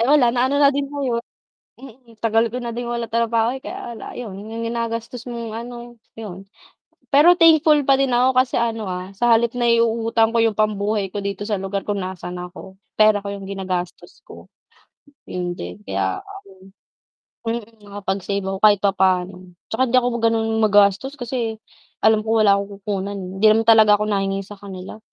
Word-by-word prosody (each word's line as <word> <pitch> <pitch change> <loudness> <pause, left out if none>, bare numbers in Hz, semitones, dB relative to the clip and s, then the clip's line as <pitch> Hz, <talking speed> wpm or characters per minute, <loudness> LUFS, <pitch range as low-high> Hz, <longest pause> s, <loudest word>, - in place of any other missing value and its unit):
Eh, 230 - +2
wala, 255 -5 +4
na-ano 260 +3 +1
na 285 -1 +5
din 280 0 -2
ngayon 260 -5 -2 0.6
mm, 240 -3 -15
tagal 225 0 +2
ko 250 - -3
na 240 - -5
din 235 +1 -4
walang 235 -1 -3
trabaho, 230 0 +1
eh, 265 - -13
kaya 235 -1 -7
la - - -9
'yun, 220 -6 -7
'yung 220 +3 -7
ginagastos 230 +1 -4
mong, 235 -2 -6
ano, 240 0 -8 0.2
'yun. 195 -3 -8 0.7
Pero 300 +5 +6
thankful 315 -3 +5
pa 275 0 +3
din 270 -2 +1
ako 255 +1 +3
kasi, 255 0 +2
ano, 230 -2 -1
ah, 185 0 -5
sa 240 -1 +4
halip 235 +1 +1
naiuutang 230 -1 +2
ko - - +4
yung 225 -2 +2
pambuhay 210 -1 0
ko 200 +1 -5
dito 200 0 -4
sa 210 -2 -1
lugar 195 +1 -3
kung 205 -1 -1
nasaan 180 -1 -6
ako, 180 +2 -9 0.2
pera 215 -1 +5
ko 200 - -4
yung 195 -1 -8
ginagastos 185 -2 -5
ko. - - -14 0.8
'Yun 175 -1 -4
din 90 +4 -8
kaya, 95 -2 -2 1.3
ano 230 +1 0
mm, 225 +1 -20
nakapag-save 200 0 -3
ako 190 0 -3
kahit 205 -1 +5
papaano, 190 -2 +1 0.4
'tsaka 225 +4 0
hindi 255 +1 +3
ako 245 - +1
ganoon 225 -1 +1
magastos 205 +4 +3
kasi 235 -4 -4 0.4
alam 220 0 +3
ko 220 0 +3
wala 200 -1 +5
akong 200 0 -5
kukunan, 200 0 -3
eh, 190 -2 -6
hindi 215 - +4
naman 215 +1 +5
talaga 220 -2 +6
ako 210 - -1
nahingi 195 -1 -1
sa 200 +1 -12
kanila, 190 0 -9
220 Hz, 180 wpm, -21 LUFS, 200-235 Hz, 1.3 s, Pero